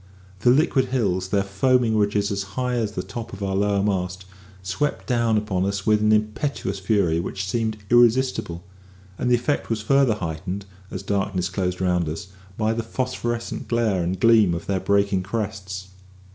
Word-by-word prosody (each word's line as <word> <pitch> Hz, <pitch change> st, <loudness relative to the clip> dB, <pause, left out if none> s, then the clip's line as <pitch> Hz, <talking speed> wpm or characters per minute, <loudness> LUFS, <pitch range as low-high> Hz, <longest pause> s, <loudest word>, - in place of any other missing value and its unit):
The 120 Hz, -, +3 dB
liquid 135 Hz, 0 st, +3 dB
hills, 100 Hz, -8 st, 0 dB
their 100 Hz, 0 st, +2 dB
foaming 115 Hz, +4 st, +2 dB
ridges 105 Hz, 0 st, +1 dB
as 100 Hz, 0 st, -1 dB, 0.2 s
high 125 Hz, -1 st, 0 dB
as 110 Hz, -4 st, -1 dB
the 90 Hz, -, -3 dB
top 110 Hz, +4 st, -7 dB
of 100 Hz, +1 st, -6 dB
our 95 Hz, -1 st, -1 dB
lower 100 Hz, 0 st, +1 dB
mast, 95 Hz, -2 st, -2 dB, 0.4 s
swept 140 Hz, +11 st, -2 dB
down 115 Hz, -3 st, +2 dB
upon 100 Hz, -4 st, -1 dB
us 100 Hz, +1 st, -2 dB
with 105 Hz, -1 st, +3 dB
an 105 Hz, 0 st, +3 dB
impetuous 105 Hz, -1 st, 0 dB
fury 95 Hz, -5 st, +1 dB
which 95 Hz, +2 st, -4 dB
seemed 110 Hz, +1 st, -1 dB
irresistible; 120 Hz, -7 st, +3 dB, 0.6 s
and 125 Hz, -, 0 dB
the 125 Hz, -, +5 dB
effect 125 Hz, +5 st, -1 dB
was 110 Hz, -2 st, -1 dB
further 135 Hz, -1 st, +3 dB
heightened, 90 Hz, +2 st, -4 dB, 0.2 s
as -, -, -6 dB
darkness 95 Hz, -2 st, -1 dB
closed 90 Hz, 0 st, -2 dB
around 90 Hz, -3 st, +1 dB
us, 80 Hz, +5 st, -6 dB, 0.3 s
by 110 Hz, 0 st, +1 dB
the 115 Hz, -, -1 dB
phosphorescent 120 Hz, 0 st, -3 dB
glare 115 Hz, -6 st, +1 dB
and 90 Hz, +2 st, -2 dB
gleam 110 Hz, -5 st, +5 dB
of 85 Hz, -, -6 dB
their 95 Hz, -1 st, 0 dB
breaking 100 Hz, 0 st, +2 dB
crests. 95 Hz, -2 st, -4 dB
100 Hz, 170 wpm, -23 LUFS, 95-115 Hz, 0.6 s, the